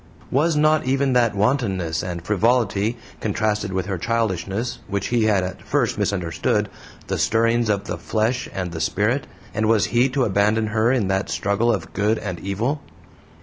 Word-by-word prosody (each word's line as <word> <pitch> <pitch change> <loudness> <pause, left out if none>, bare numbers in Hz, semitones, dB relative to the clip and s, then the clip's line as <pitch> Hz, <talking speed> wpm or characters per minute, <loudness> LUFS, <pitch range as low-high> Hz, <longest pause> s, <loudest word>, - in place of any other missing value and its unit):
Was 155 +5 +2
not 155 0 +3
even 135 0 +2
that 120 -4 +3
wantonness 100 - 0
and 85 -1 -5
frivolity 110 +1 +1 0.2
contrasted 105 -1 -1
with 95 -1 -1
her 95 -3 -3
childishness 110 +1 -1
which 100 0 -2
he 120 -2 +2
had 100 -4 +3
at 90 0 -5
first - - 0
misunderstood 90 -4 0 0.4
the - - -2
stirrings 115 0 +2
of 100 -2 +1
the - - -5
flesh 115 +3 -1
and 90 -2 -4
the 80 -1 -5
spirit, 105 - 0 0.3
and 110 +1 0
was 110 -2 +4
he 120 +3 +4
to 135 0 0
abandon 105 +1 +2
her 110 +2 +2
in 120 -7 +1
that 95 0 0
struggle 105 +4 +1
of 90 -7 -3
good 105 +2 +1
and 95 -5 -5
evil? 115 +10 -2
110 Hz, 170 wpm, -22 LUFS, 95-120 Hz, 0.4 s, was